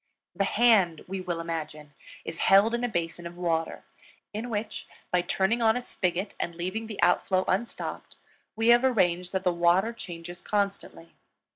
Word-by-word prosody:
The 195 Hz, -, +1 dB
hand, 200 Hz, -8 st, +3 dB
we 190 Hz, 0 st, -4 dB
will 175 Hz, -2 st, -3 dB
imagine, 155 Hz, -3 st, -5 dB, 0.3 s
is 165 Hz, -, -6 dB
held 200 Hz, +4 st, +5 dB
in 240 Hz, +1 st, -1 dB
a 245 Hz, -, 0 dB
basin 170 Hz, -3 st, -3 dB
of 175 Hz, +1 st, -11 dB
water, 165 Hz, -2 st, -1 dB, 0.5 s
in 220 Hz, +4 st, -4 dB
which, 215 Hz, -1 st, -4 dB, 0.2 s
by 180 Hz, -, +3 dB
turning 195 Hz, +6 st, 0 dB
on 225 Hz, +1 st, +4 dB
a -, -, -3 dB
spigot 185 Hz, -3 st, -2 dB
and 170 Hz, -, -3 dB
leaving 185 Hz, +6 st, -4 dB
the 215 Hz, -2 st, -8 dB
outflow 185 Hz, -1 st, +3 dB
unstopped, 215 Hz, +6 st, -3 dB, 0.4 s
we 225 Hz, +1 st, +2 dB
have 240 Hz, +1 st, +6 dB
arranged 180 Hz, -8 st, +2 dB
that 190 Hz, -1 st, -2 dB
the 180 Hz, -2 st, +2 dB
water 175 Hz, +6 st, +3 dB
changes 175 Hz, -4 st, -8 dB
constantly. 200 Hz, -, -3 dB
185 Hz, 165 wpm, -27 LUFS, 170-220 Hz, 0.5 s, have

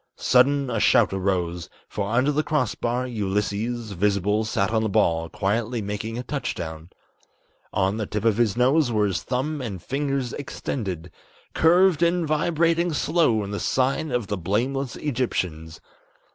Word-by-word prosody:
Sudden 135 Hz, +1 st, +3 dB
a 115 Hz, -, 0 dB
shout -, -, +4 dB
arose, 90 Hz, -3 st, -1 dB, 0.2 s
for 100 Hz, -1 st, -3 dB
under 125 Hz, +6 st, +2 dB
the 150 Hz, +1 st, +1 dB
crossbar, 125 Hz, -4 st, -1 dB
Ulysses, 110 Hz, +1 st, -2 dB
Visible, 100 Hz, +2 st, +1 dB
sat 105 Hz, -2 st, 0 dB
on 110 Hz, -1 st, +2 dB
the 110 Hz, -, 0 dB
ball, 85 Hz, -3 st, +1 dB
quietly 115 Hz, +4 st, -1 dB
making 105 Hz, +2 st, -4 dB
a 125 Hz, -, -4 dB
touch 140 Hz, -1 st, -3 dB
down; 80 Hz, -1 st, -7 dB, 0.8 s
On 95 Hz, +2 st, 0 dB
the 110 Hz, -2 st, -3 dB
tip 105 Hz, +1 st, -3 dB
of 110 Hz, -2 st, +3 dB
his 115 Hz, -2 st, +1 dB
nose 130 Hz, +2 st, +3 dB
were 105 Hz, -2 st, +2 dB
his 95 Hz, -3 st, -1 dB
thumb 140 Hz, +4 st, -2 dB
and 105 Hz, -7 st, -5 dB
fingers 135 Hz, -, -2 dB
extended, 95 Hz, -, -5 dB, 0.4 s
Curved 175 Hz, 0 st, +4 dB
and 170 Hz, -1 st, +2 dB
vibrating 165 Hz, +2 st, +1 dB
slow 145 Hz, -9 st, +2 dB
in 100 Hz, -, -6 dB
the 100 Hz, -, -3 dB
sign 135 Hz, +4 st, 0 dB
of 125 Hz, -4 st, -1 dB
the 105 Hz, 0 st, -3 dB
blameless 120 Hz, +8 st, -1 dB
Egyptians. 90 Hz, -, -3 dB
115 Hz, 155 wpm, -24 LUFS, 100-140 Hz, 0.8 s, shout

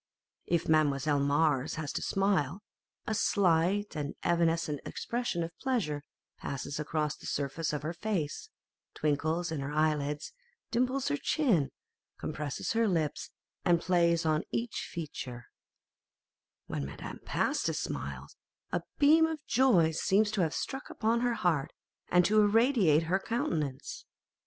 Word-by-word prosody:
If 170 Hz, -1 st, +1 dB
Mademoiselle 145 Hz, -2 st, +3 dB
Mars 145 Hz, 0 st, +2 dB
has 155 Hz, -3 st, -4 dB
to -, -, -2 dB
smile, 195 Hz, -2 st, 0 dB, 0.4 s
a 220 Hz, -, -1 dB
slight 190 Hz, 0 st, +2 dB
and 145 Hz, -2 st, -3 dB
evanescent 165 Hz, -3 st, +1 dB
expression 235 Hz, -8 st, -2 dB
of 165 Hz, 0 st, -6 dB
pleasure 190 Hz, -, -1 dB, 0.4 s
passes 140 Hz, +1 st, -4 dB
across 150 Hz, 0 st, -1 dB
the -, -, -10 dB
surface 145 Hz, +3 st, -2 dB
of 150 Hz, -1 st, -3 dB
her 160 Hz, +2 st, -2 dB
face; 175 Hz, -5 st, -3 dB, 0.5 s
twinkles 160 Hz, +3 st, 0 dB
in 160 Hz, -, -2 dB
her 140 Hz, +1 st, -3 dB
eyelids, 150 Hz, -1 st, 0 dB, 0.4 s
dimples 255 Hz, +3 st, +1 dB
her 290 Hz, -, 0 dB
chin, 230 Hz, -, +2 dB, 0.5 s
compresses 150 Hz, -2 st, -3 dB
her 230 Hz, 0 st, +3 dB
lips, 160 Hz, -6 st, -1 dB, 0.3 s
and 175 Hz, -2 st, +4 dB
plays 170 Hz, -2 st, +2 dB
on 155 Hz, 0 st, +2 dB
each 235 Hz, 0 st, -3 dB
feature: 130 Hz, -7 st, -6 dB, 1.2 s
when 70 Hz, -, -3 dB
Madame 70 Hz, +1 st, -7 dB
Pasta -, -, 0 dB
smiles, 70 Hz, 0 st, -5 dB, 0.4 s
a -, -, 0 dB, 0.2 s
beam 315 Hz, +3 st, +6 dB
of 315 Hz, -2 st, -5 dB
joy 205 Hz, -12 st, +4 dB
seems 205 Hz, +6 st, +2 dB
to 215 Hz, -3 st, 0 dB
have 160 Hz, -3 st, 0 dB
struck 270 Hz, 0 st, -4 dB
upon 230 Hz, +2 st, +1 dB
her 245 Hz, -1 st, +1 dB
heart, 170 Hz, -9 st, 0 dB, 0.4 s
and 180 Hz, 0 st, +5 dB
to 215 Hz, +1 st, +5 dB
irradiate 210 Hz, -, +4 dB
her 180 Hz, +4 st, +1 dB
countenance. 155 Hz, -, -3 dB
165 Hz, 135 wpm, -31 LUFS, 150-210 Hz, 1.2 s, beam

